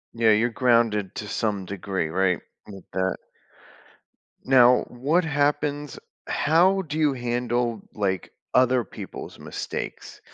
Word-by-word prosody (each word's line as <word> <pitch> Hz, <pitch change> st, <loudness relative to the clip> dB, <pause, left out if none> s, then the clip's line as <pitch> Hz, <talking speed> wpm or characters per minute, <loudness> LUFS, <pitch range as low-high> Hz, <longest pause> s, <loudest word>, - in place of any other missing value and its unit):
Yeah, 115 Hz, -1 st, +3 dB
you're 115 Hz, +3 st, +3 dB
grounded 115 Hz, -5 st, +2 dB
to 105 Hz, -, -5 dB
some 105 Hz, -3 st, -2 dB
degree, 95 Hz, -3 st, -3 dB
right, 90 Hz, +1 st, +1 dB, 0.3 s
with 100 Hz, -2 st, -10 dB
that. 95 Hz, 0 st, 0 dB, 1.3 s
Now 125 Hz, -1 st, +6 dB
what 145 Hz, +9 st, +1 dB
happens 145 Hz, -1 st, -1 dB, 0.3 s
how 180 Hz, +6 st, +3 dB
do 155 Hz, -2 st, -5 dB
you 150 Hz, -3 st, +3 dB
handle, 120 Hz, -2 st, -1 dB
like, 95 Hz, -3 st, -2 dB, 0.2 s
other 125 Hz, -1 st, +4 dB
people's -, -, -9 dB
mistakes? -, -, -6 dB
120 Hz, 115 wpm, -25 LUFS, 100-140 Hz, 1.3 s, Now